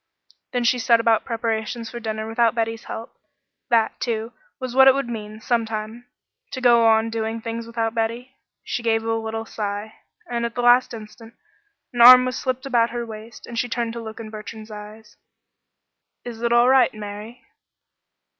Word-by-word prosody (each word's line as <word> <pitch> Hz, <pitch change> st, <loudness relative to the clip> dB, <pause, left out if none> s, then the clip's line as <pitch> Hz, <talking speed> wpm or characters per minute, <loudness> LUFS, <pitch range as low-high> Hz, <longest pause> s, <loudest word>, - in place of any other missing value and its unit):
Then 245 Hz, -1 st, -1 dB
she 245 Hz, +1 st, +2 dB
set 235 Hz, -1 st, +4 dB
about 230 Hz, -1 st, +2 dB
preparations 225 Hz, 0 st, -3 dB
for 240 Hz, -, -6 dB
dinner 220 Hz, -1 st, -4 dB
without 230 Hz, 0 st, +1 dB
Betty's 225 Hz, -1 st, -2 dB
help. 225 Hz, -, -7 dB, 0.6 s
That, 230 Hz, -2 st, +2 dB
too, 225 Hz, -1 st, -3 dB, 0.3 s
was 255 Hz, -2 st, -5 dB
what 265 Hz, +1 st, +7 dB
it 270 Hz, -, +7 dB
would 275 Hz, -2 st, -2 dB
mean 215 Hz, -2 st, -7 dB
sometime 225 Hz, 0 st, -3 dB, 0.5 s
to 260 Hz, -, -3 dB
go 235 Hz, -2 st, +5 dB
on 225 Hz, 0 st, +3 dB
doing 225 Hz, 0 st, -3 dB
things 230 Hz, 0 st, -5 dB
without 230 Hz, -1 st, -2 dB
Betty. 235 Hz, +3 st, -3 dB, 0.3 s
She 245 Hz, -, -3 dB
gave 225 Hz, -1 st, +1 dB
a 225 Hz, 0 st, -1 dB
little 225 Hz, 0 st, -3 dB
sigh, 210 Hz, 0 st, -5 dB, 0.3 s
and 235 Hz, -1 st, -2 dB
at 235 Hz, 0 st, -3 dB
the 245 Hz, +1 st, +5 dB
instant 225 Hz, +1 st, -11 dB, 0.6 s
an 240 Hz, -, 0 dB
arm 250 Hz, +1 st, +10 dB
was 255 Hz, -1 st, -2 dB
slipped 255 Hz, +1 st, -3 dB
about 240 Hz, -3 st, +2 dB
her 240 Hz, 0 st, -4 dB
waist, 220 Hz, 0 st, -10 dB
and 235 Hz, -1 st, -5 dB
she 245 Hz, -, -1 dB
turned 230 Hz, -1 st, -2 dB
to 235 Hz, -, -6 dB
look 220 Hz, 0 st, -8 dB
in 220 Hz, -1 st, -8 dB
Bertrand's 215 Hz, 0 st, -9 dB
eyes. 210 Hz, +1 st, -11 dB, 1.1 s
"Is 235 Hz, -2 st, -7 dB
it 235 Hz, 0 st, 0 dB
all 240 Hz, +1 st, +5 dB
right, 265 Hz, 0 st, +5 dB
Mary?" 215 Hz, +3 st, -8 dB
230 Hz, 175 wpm, -22 LUFS, 220-240 Hz, 1.1 s, arm